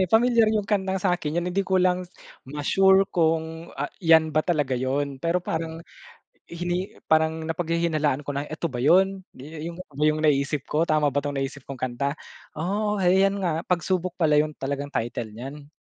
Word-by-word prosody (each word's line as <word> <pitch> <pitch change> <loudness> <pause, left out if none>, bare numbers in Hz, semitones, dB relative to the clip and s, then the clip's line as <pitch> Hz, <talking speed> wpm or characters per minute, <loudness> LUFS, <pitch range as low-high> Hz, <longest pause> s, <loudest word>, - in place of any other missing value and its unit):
eh, 185 - +3
pamilyar 230 +1 +4
'yung 210 -2 0
kantang 190 -2 0
sa 180 -1 +2
akin 155 -2 -4
eh, - - -4
hindi 195 - +1
ko 190 - +1
lang 180 -1 +1 0.4
ma-sure 190 +7 +4
kung 160 -1 0
a 140 - -2 0.2
'yan 160 -2 +5
ba 155 - +3
talaga 150 -5 0
'yon. 135 +2 -1
Pero 170 +3 0
parang 165 0 -4 0.6
hini 175 +2 -3 0.2
parang 160 0 +3
napaghihinalaan 160 -4 0
ko 145 - -4
na, 140 +1 -2
"Eto 155 +2 -4
ba 125 - -6
'yon? 190 +7 +3
Dii 150 +4 -9
'yung 170 0 -7 0.2
'yung 155 0 +2
na-iisip 145 -1 +2
ko, 160 +3 +2
tama 155 -2 +2
ba 140 +1 0
'tong 145 0 -2
na-isip 135 0 -4
kong 140 - -7
kanta?" 130 +2 -1 0.4
Oo, 205 +5 -1
'yan 190 +2 +4
nga, 170 -2 -1
"Pagsubok" 180 0 0
pala 155 -4 +3
'yun 155 0 0
talagang 140 +1 -4
title 115 -1 -3
niyan. 135 +5 -8
160 Hz, 180 wpm, -25 LUFS, 145-180 Hz, 0.6 s, yan